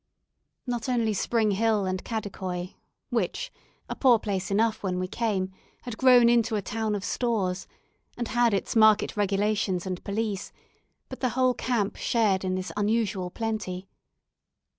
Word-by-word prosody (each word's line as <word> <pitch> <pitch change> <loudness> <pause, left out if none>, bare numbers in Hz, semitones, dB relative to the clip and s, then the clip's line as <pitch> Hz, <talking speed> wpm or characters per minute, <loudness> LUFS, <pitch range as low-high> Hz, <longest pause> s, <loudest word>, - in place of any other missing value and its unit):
Not 240 -1 -3
only 230 -3 +1
Spring 220 +1 +1
Hill 210 0 +2
and 185 0 -2
Kadikoi, 190 -5 -4 0.4
which - - -2 0.3
a - - -4
poor 250 -4 +5
place 195 -3 -3
enough 220 +2 +1
when 185 -2 -2
we 185 0 -2
came 195 -3 -1 0.3
had 245 -3 -5
grown 250 -2 +7
into 235 -1 +3
a 205 - 0
town 220 0 -2
of 200 - -4
stores, 200 -7 -1 0.5
and 240 -1 -2
had 240 -1 +3
its 200 +3 -1
market 215 -1 +5
regulations 205 -2 0
and 185 -1 -4
police, 205 -1 -3 0.6
but 260 - -8
the 255 - +1
whole 255 -1 +4
camp 230 -4 -1
shared 210 -5 +1
in 185 0 -1
this 185 0 -4
unusual 205 -3 0
plenty. 210 -3 -4
215 Hz, 150 wpm, -27 LUFS, 190-230 Hz, 0.6 s, grown